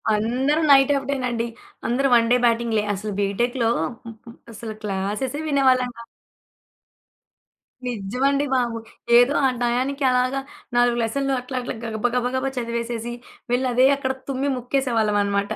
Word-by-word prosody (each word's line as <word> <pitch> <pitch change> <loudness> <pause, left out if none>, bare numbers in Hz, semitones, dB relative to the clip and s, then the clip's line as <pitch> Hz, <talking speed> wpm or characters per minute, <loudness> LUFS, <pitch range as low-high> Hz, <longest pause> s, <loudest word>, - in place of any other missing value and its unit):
అందరూ 255 +8 +1
నైట్ 270 0 +6
ఔటేనండి. 250 -4 -2 0.4
అందరూ 265 +3 +1
1 230 -1 +3
డే 250 - +6
బ్యాటింగ్‌లే 230 -2 +1
అసలు 210 +2 -4
బీటెక్‌లో 230 +4 0 0.4
హ్మ్ 230 - -8
హ్మ్ 235 0 -12 0.2
అసలు 220 +1 -7
క్లాసెసే 210 +8 -2
వినేవాళ్ళం 260 -3 +3
కాదు. 235 - -10 1.8
నిజ్జమండి 250 +6 0
బాబు! 240 -2 0 0.4
ఏదో 245 +4 +5
ఆ - - +6
టయానికి 255 +4 0
అలాగా 255 +2 +1 0.4
4 240 0 +3
లెసన్లు 275 +4 -1
అట్లా 255 +1 -8
అట్లా 245 - -4
గబ 220 -2 -4
బగ 245 0 +1
గబా 265 +1 0
చదివేసేసి, 235 0 -3 0.4
వెళ్ళి 255 +1 +1
అదే 255 +2 +5
అక్కడ 265 -1 -2 0.2
తుమ్మి 275 +1 -1
ముక్కేసేవాళ్ళమనమాట. 215 -6 0
245 Hz, 130 wpm, -23 LUFS, 230-265 Hz, 1.8 s, నైట్